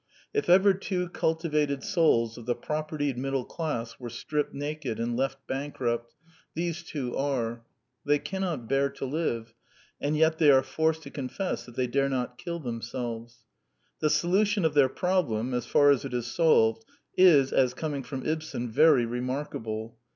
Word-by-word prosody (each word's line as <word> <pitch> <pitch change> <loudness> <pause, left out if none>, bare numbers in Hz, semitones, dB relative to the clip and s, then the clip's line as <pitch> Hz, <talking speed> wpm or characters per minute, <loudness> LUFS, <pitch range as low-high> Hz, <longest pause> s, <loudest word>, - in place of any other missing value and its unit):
If 430 - -1
ever 195 +2 +6
two 180 -2 -3
cul 160 -2 0
tivated 150 -4 -1
souls 155 - +2
of 120 - -11
the 120 - +1
propertied 150 -1 -3
middle 135 -1 -1
class 145 -9 -4
were 120 -2 -6
stripped 150 +5 -2
naked 145 -5 -4
and 120 +1 -1
left 135 +2 -1
bankrupt, 120 -4 -3 0.4
these 170 0 -2
two 140 -7 -4
are. 120 -4 -1 0.4
They 145 0 +3
cannot 175 -7 -3
bear 135 +2 +2
to 135 0 -6
live; 125 -6 -2 0.5
and 150 +2 0
yet 160 0 +3
they 155 -3 +6
are 135 -1 +6
forced 160 +2 0
to - - -10
confess 140 +7 -4
that 120 - -12
they 130 - +1
dare 135 +3 +1
not 125 -2 -3
kill 170 0 -4
themselves. 115 -2 -5 0.5
The 155 - +2
solution 190 +5 +2
of 160 - +2
their 140 -3 +5
problem, 135 -9 0
as 125 - -2
far 145 0 +5
as 140 - +2
it - - -4
is 120 -2 -1
solved, 120 -4 +3 0.3
is, 150 -8 +6
as 125 -1 +3
coming 145 -2 -3
from 130 +1 -6
Ibsen, 155 -7 -3
very 145 -1 +5
remarkable. 115 -3 -4
140 Hz, 165 wpm, -28 LUFS, 120-160 Hz, 0.5 s, ever